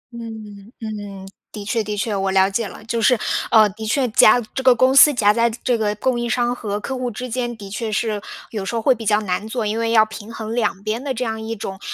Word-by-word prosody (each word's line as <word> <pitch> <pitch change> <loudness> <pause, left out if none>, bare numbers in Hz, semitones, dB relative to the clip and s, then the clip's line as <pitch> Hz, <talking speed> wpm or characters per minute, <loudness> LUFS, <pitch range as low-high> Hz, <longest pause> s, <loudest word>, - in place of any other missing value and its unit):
嗯 230 -1 -7 0.5
嗯， 205 -3 -7 0.3
的 205 -2 -8
确 225 +1 0
的 210 0 -4
确， 210 0 -1
我 195 0 -1
了 190 0 +4
解 205 +2 -2
了。 205 - -12
就 230 -1 -2
是， 250 +1 +4 0.3
呃， 220 -2 +6
的 220 +3 -8
确 255 +2 +1
夹 215 +2 +6
这 265 - -2
个 255 -2 +5
公 260 +3 +3
司 295 +2 +9
夹 210 -5 +3
在 235 +1 +2
这 245 +2 -1
个 210 -2 -1
供 240 +3 0
应 240 0 -2
商 240 0 +1
和 205 -3 -4
客 265 +5 -5
户 250 -1 -3
之 250 +3 -6
间， 240 -1 -3
的 200 -2 -9
确 220 +1 -3
是 210 -1 -1 0.3
有 210 -4 -4
时 230 - -4
候 225 - -1
会 265 - +5
比 225 -3 -7
较 210 0 +4
难 195 +1 -2
做， 225 -1 -3
因 215 +2 -1
为 230 0 0
要 220 -1 +5
平 220 0 -10
衡 225 0 -6
两 210 -5 -1
边 220 +4 -3
的 265 -3 -3
这 250 - -2
样 220 0 -3
一 225 +1 -4
种 190 -1 -7
220 Hz, 275 characters per minute, -20 LUFS, 210-240 Hz, 0.5 s, 司